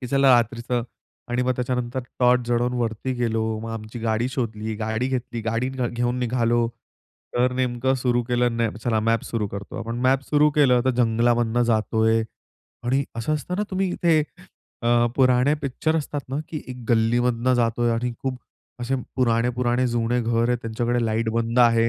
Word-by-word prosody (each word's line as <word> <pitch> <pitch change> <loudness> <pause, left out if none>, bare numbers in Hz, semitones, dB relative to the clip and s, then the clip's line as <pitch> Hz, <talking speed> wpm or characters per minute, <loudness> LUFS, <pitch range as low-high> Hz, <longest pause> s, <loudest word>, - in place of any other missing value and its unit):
की 125 - -5
चला 135 +1 +4
रात्रीचं 120 +1 0 0.5
आणि 125 +1 +1
मग 130 - +1
त्याच्यानंतर 125 0 -2 0.2
टॉर्च 125 -1 +3
जळवून 120 +1 +1
वरती 115 +2 -2
गेलो. 115 -2 0 0.2
मग 115 +1 -6
आमची 110 +1 -7
गाडी 115 +2 0
शोधली, 110 -4 -3
गाडी 110 +3 -1
घेतली. 125 -3 -3
गाडी 115 +3 -1
घ 130 -2 -2
घेऊन 120 +1 -1
निघालो. 120 -1 +1 0.7
तर 125 +1 +2
नेमकं 125 0 0
सुरू 120 -1 +2
केलं 120 -1 +1
न 115 -1 +1 0.2
चला 110 -3 +1
मॅप 115 -1 +2
सुरू 110 -3 -2
करतो. 100 0 -7
आपण 115 +1 -4
मॅप 130 +1 +3
सुरू 150 0 +4
केलं 140 -4 +4
तर 130 - +3
जंगलामधून 120 0 +2
जातो 110 -1 +1
आहे 115 0 +3 0.6
आणि 135 +3 +1
असं 135 +7 -1
असतं 165 +4 -4
ना, 210 - 0
तुम्ही 190 -1 0
इथे 165 -3 +3 0.6
अ, 120 0 +3
पुराणे 130 +1 +4
पिक्चर 155 +4 0
असतात 145 -2 -3
ना, 135 - -3
की 155 - -5
एक 125 - -6
गल्लीमधनं 120 +2 +2
जातो 120 -1 +1
आहे 120 -1 +3
आणि 120 +1 -1
खूप 130 -1 -2 0.4
असे 120 +2 -1 0.2
पुराणे, 120 -2 +2
पुराणे 125 0 +1
जुने 120 +1 0
घर 115 +1 +1
आहेत. 125 - +1
त्यांच्याकडे 120 +1 -1
लाईट 110 +1 0
बंदं 115 +1 +1
आहे. 115 -1 +4
120 Hz, 180 wpm, -23 LUFS, 115-125 Hz, 0.7 s, चला